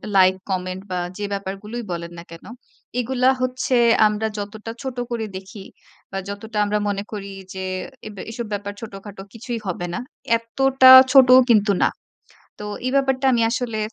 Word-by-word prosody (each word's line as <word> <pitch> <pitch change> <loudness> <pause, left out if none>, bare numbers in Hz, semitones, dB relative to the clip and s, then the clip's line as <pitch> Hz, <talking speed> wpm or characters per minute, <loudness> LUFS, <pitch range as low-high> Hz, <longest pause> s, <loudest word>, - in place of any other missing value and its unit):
Like, 185 -1 +5 0.2
comment 185 0 -3
বা, 180 - -1 0.2
যে 205 - -3
ব্যাপারগুলোই 200 +4 -5
বলেন 170 0 -5
না 170 - -8
কেন? 165 - -12 0.5
এগুলা 255 +1 +2
হচ্ছে 255 +1 -1 0.3
আমরা 210 +1 -1
যতটা 215 +2 -6
ছোট 260 -2 -6
করে 230 -2 -2
দেখি 190 +2 -10 0.5
বা, 195 - -4
যতটা 210 +2 -7
আমরা 210 +1 0
মনে 200 0 -2
করি 200 -2 -6 0.2
যে, 190 0 -5 0.4
এব 210 - -10 0.2
এসব 235 0 -5
ব্যাপার 205 0 -4
ছোটখাটো, 200 -2 -9
কিছুই 235 0 -5
হবে 175 -1 -3
না। - - -3 0.4
এত্তটা 260 +3 +3 0.2
ছোটও 255 -2 +8
কিন্তু 210 -2 +4
না। - - +4 0.7
তো - - -5 0.2
এই - - +1
ব্যাপারটা 270 -1 +1
আমি 235 - +2
আসলে 235 -2 -2
215 Hz, 160 wpm, -21 LUFS, 195-245 Hz, 0.7 s, ছোটও